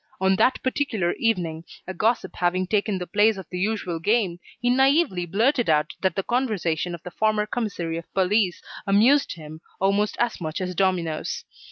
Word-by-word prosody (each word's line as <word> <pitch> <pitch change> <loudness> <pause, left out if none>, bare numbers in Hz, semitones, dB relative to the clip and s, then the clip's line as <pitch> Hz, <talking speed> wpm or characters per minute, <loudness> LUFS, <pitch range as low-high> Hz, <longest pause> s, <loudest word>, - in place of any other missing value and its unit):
On 190 0 +3
that 255 - +3
particular 240 -9 0
evening, 170 -8 0 0.2
a 185 - -5
gossip 220 +6 0
having 180 +1 +1
taken 205 0 0
the 180 - -4
place 210 +3 +3
of 190 - -7
the 180 - -4
usual 190 -4 -1
game, 195 -2 +1 0.2
he 245 - -2
naively 265 - +3
blurted 235 - +2
out 150 -1 +2
that 190 -3 +1
the 195 - -1
conversation 185 - -1
of 170 - -14
the 180 - -8
former 215 +2 +1
commissary 190 -8 -3
of 170 - -14
police 190 0 +1 0.2
amused 230 +9 +4
him 155 0 -10 0.2
almost 200 +2 +1
as 240 -5 0
much 155 -1 -3
as 180 -1 -3
dominoes. 175 -4 -1
190 Hz, 175 wpm, -24 LUFS, 175-220 Hz, 0.2 s, amused